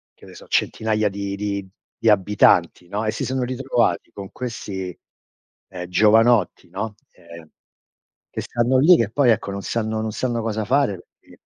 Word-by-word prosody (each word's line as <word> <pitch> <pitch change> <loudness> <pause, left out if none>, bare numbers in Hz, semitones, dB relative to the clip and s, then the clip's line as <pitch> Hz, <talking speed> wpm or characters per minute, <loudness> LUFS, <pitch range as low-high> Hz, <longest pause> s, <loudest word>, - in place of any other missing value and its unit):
che - - -17
ne - - -13
so, - - -13
centinaia 110 -1 0
di 100 0 -4
di 100 -1 -4 0.3
di 115 - +2
abitanti, 95 -4 +3
no, 105 +4 -3
e 110 - +1
si - - -4
sono 130 0 -1
ritrovati 125 -7 0
con 100 -1 -9
questi, 95 -7 -6 0.7
ehm, 90 -2 -7
giovanotti, 110 0 +3
no, 105 +4 -5 0.2
ehm, 85 -2 -14 0.8
che - - -4
stanno 120 +2 +1
lì, 170 +6 +7
che 110 -3 0
poi 135 +1 +3
ecco 100 -2 -1
non 100 0 -5
sanno 110 -1 -2
non 110 0 -3
sanno 120 +1 -2
cosa 110 -1 -2
fare, 135 -1 +2 0.3
perché, - - -20
110 Hz, 170 wpm, -22 LUFS, 100-120 Hz, 0.8 s, lì